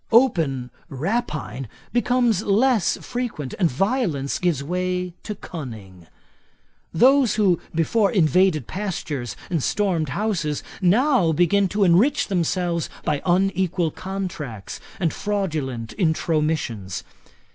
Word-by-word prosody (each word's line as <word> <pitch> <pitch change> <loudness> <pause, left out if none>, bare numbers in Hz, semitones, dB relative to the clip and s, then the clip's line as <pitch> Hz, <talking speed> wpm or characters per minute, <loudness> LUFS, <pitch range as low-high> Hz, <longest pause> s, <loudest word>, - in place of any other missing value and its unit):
Open 160 - +3 0.2
rapine 145 - -3 0.3
becomes 240 -4 +2
less 220 0 +2
frequent, 235 - -4
and 175 -4 +3
violence 170 - 0
gives 170 -6 0
way 180 +2 -2
to 210 - -5
cunning. 110 - -9 0.8
Those 260 +6 +4
who 195 -6 +3
before 200 +6 +2
invaded 180 - +3
pastures 155 - -4 0.2
and 165 -4 +1
stormed 175 -3 0
houses, 170 - -1 0.2
now 205 - +3
begin 190 +5 +3
to 205 +3 0
enrich 205 - +3
themselves 175 -2 0
by 150 -2 0
unequal 180 -2 +1
contracts 170 - -6 0.2
and 170 -4 +1
fraudulent 155 - -2
intromissions. 155 - 0
175 Hz, 105 wpm, -23 LUFS, 150-205 Hz, 0.8 s, Those